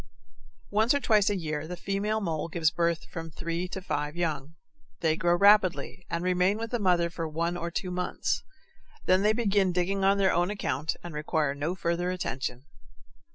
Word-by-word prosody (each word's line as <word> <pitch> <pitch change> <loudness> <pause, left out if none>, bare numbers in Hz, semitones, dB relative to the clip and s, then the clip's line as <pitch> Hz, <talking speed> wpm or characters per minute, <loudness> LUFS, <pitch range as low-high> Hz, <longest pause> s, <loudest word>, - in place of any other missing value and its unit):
Once 220 +6 +3
or - - +2
twice 215 -6 +3
a 205 - 0
year 155 -3 -3
the 180 +1 -6
female 200 +4 -1
mole 165 -5 -2
gives 165 -2 +1
birth 170 -1 0
to - - -17
from 165 -1 -6
three 170 +3 -3
to 190 +1 -6
five 150 -2 -2
young. 160 -3 -2 0.5
They 160 -1 +2
grow 175 +1 +2
rapidly, 195 -2 +3
and 170 +1 -2
remain 185 +2 +2
with 230 0 -5
the 240 - 0
mother 175 -4 +2
for 165 -1 -3
one 170 +3 -1
or 170 -1 -3
two 180 +2 -3
months. 180 0 -1 0.6
Then 185 +1 +4
they 210 +1 +4
begin 200 -4 +2
digging 185 +2 0
on 195 +1 +4
their 195 -1 +3
own 175 +2 +2
account 160 -7 -2
and 175 -2 -7
require 150 -1 0
no 150 +5 -2
further 175 0 -1
attention. 135 -7 -3
175 Hz, 190 wpm, -28 LUFS, 165-195 Hz, 0.6 s, Then